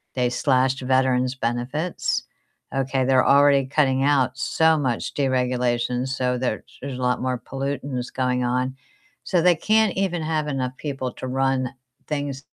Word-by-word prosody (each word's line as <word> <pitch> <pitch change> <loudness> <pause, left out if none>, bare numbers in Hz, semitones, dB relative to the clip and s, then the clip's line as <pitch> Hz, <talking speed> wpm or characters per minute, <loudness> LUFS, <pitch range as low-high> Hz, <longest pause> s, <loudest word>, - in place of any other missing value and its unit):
they 125 -1 +1
slashed 130 +1 +1
veterans 130 0 +2
benefits. 130 +8 -2 0.5
Okay, 135 -1 0
they're 130 -1 +4
already 140 -1 +5
cutting 135 -2 +2
out 135 -3 +2
so 160 +5 +3
much 130 -5 -2
deregulation, 125 -2 0
so 125 -1 -1
there 120 -4 -2 0.2
there's 135 -2 -5
a - - -6
lot 125 0 +1
more 130 -1 -1
pollutants 135 0 -4
going 125 -1 0
on. 125 +1 -1 0.5
So, 180 - +1
they 175 0 +5
can't 215 +4 +2
even 185 -3 0
have 155 -1 -1
enough 130 -3 -2
people 135 -4 -4
to 130 - -7
run 130 -1 0 0.4
things 145 -2 -3
130 Hz, 150 wpm, -23 LUFS, 125-140 Hz, 0.5 s, already